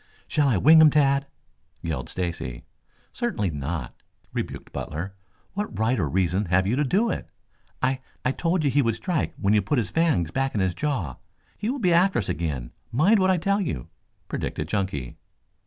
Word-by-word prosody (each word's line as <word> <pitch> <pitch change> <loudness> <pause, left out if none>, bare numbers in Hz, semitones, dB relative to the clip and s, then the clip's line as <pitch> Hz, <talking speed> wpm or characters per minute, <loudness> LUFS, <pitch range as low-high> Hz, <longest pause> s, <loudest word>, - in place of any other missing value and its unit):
"Shall 150 -2 +2
I 120 -7 +3
wing 160 - +7
him, 155 - +9
Tad?" 140 -1 +3 0.6
yelled 80 -7 -3
Stacy. 85 -9 -4 0.5
"Certainly 230 - -1
not," 75 +3 -5 0.3
rebuked - - -4
Butler. 85 +6 -4 0.4
"What 200 - -3
right 110 +2 +1
or 80 -6 0
reason 95 +4 +1
have 95 +1 +2
you 105 +5 +1
to 145 - +2
do 205 - +2
it?" - - -5 0.5
"I 130 +1 +2 0.3
I 130 - +3
told 165 +3 0
you 140 - +2
he 145 +3 +4
would 115 -4 +1
strike 175 +3 -2
when 100 0 +2
you 105 - +4
put 150 - 0
his 105 -7 0
fangs 145 - +2
back 135 +3 -1
in - - +1
his 95 -2 +1
jaw. 110 - -2 0.4
He 215 - -3
will 270 - -1
be 185 -9 +2
after 185 +3 +4
us 110 - -1
again, 70 -7 -2 0.2
mind 185 - +4
what 190 0 +3
I 185 - +4
tell 200 +4 +1
you," 80 - -3 0.4
predicted 75 - -3
Chunky. 95 - -2
120 Hz, 190 wpm, -25 LUFS, -, 0.6 s, him